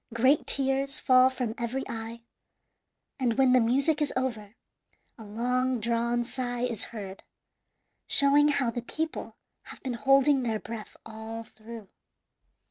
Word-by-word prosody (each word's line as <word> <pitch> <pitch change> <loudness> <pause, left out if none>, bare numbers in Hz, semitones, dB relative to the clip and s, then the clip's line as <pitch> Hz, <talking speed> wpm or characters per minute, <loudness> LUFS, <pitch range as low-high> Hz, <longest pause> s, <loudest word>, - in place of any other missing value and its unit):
Great 260 +5 +3
tears 275 +1 +1
fall 255 -1 +5
from 250 -4 -3
every 240 +3 -3
eye, 225 +1 -6 1.0
and 240 -3 +1
when 265 -2 +4
the 255 - +6
music 275 +6 +2
is 295 - +1
over 230 -5 -3 0.6
a - - -9
long 250 +4 -1
drawn 235 +1 0
sigh 245 -1 -4
is 235 -4 -2
heard, 195 -4 -8 0.9
showing 285 +1 +5
how 280 -5 +1
the 240 - -4
people 315 +6 -4 0.3
have - - -11
been 260 -2 -3
holding 275 +3 +4
their 225 -3 -1
breath 220 -1 -8
all 225 +1 -7
through. 220 -1 -12
245 Hz, 135 wpm, -28 LUFS, 225-270 Hz, 1.0 s, the